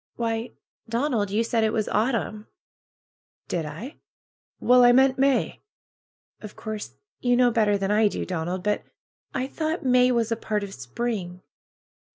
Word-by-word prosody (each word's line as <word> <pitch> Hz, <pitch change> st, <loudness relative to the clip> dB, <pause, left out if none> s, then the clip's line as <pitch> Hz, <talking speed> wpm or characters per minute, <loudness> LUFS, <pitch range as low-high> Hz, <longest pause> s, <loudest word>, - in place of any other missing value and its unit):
"Why, 230 Hz, 0 st, -2 dB, 0.4 s
Donald, 230 Hz, -4 st, 0 dB
you 210 Hz, +3 st, +1 dB
said 230 Hz, -1 st, 0 dB
it 220 Hz, -, +2 dB
was 220 Hz, -2 st, 0 dB
autumn!" 215 Hz, -2 st, -1 dB, 1.0 s
"Did 165 Hz, -3 st, -2 dB
I? 195 Hz, -, -8 dB, 0.6 s
Well, 250 Hz, 0 st, +5 dB
I 245 Hz, -, +8 dB
meant 265 Hz, +1 st, +4 dB
May." 275 Hz, 0 st, +1 dB, 0.8 s
"Of 210 Hz, -1 st, -9 dB
course 215 Hz, -1 st, -6 dB, 0.2 s
you 245 Hz, -1 st, +2 dB
know 245 Hz, 0 st, +4 dB
better 210 Hz, -3 st, +2 dB
than 195 Hz, 0 st, -1 dB
I 215 Hz, +1 st, +4 dB
do, -, -, -3 dB
Donald, 180 Hz, +1 st, -3 dB
but 210 Hz, +1 st, 0 dB, 0.5 s
I 260 Hz, -, 0 dB
thought 315 Hz, +3 st, -3 dB
May 250 Hz, 0 st, +4 dB
was 235 Hz, -2 st, 0 dB
a -, -, +2 dB
part 215 Hz, -2 st, -2 dB
of 195 Hz, -1 st, -7 dB
spring." 180 Hz, -, -4 dB
225 Hz, 155 wpm, -25 LUFS, 205-250 Hz, 1.0 s, I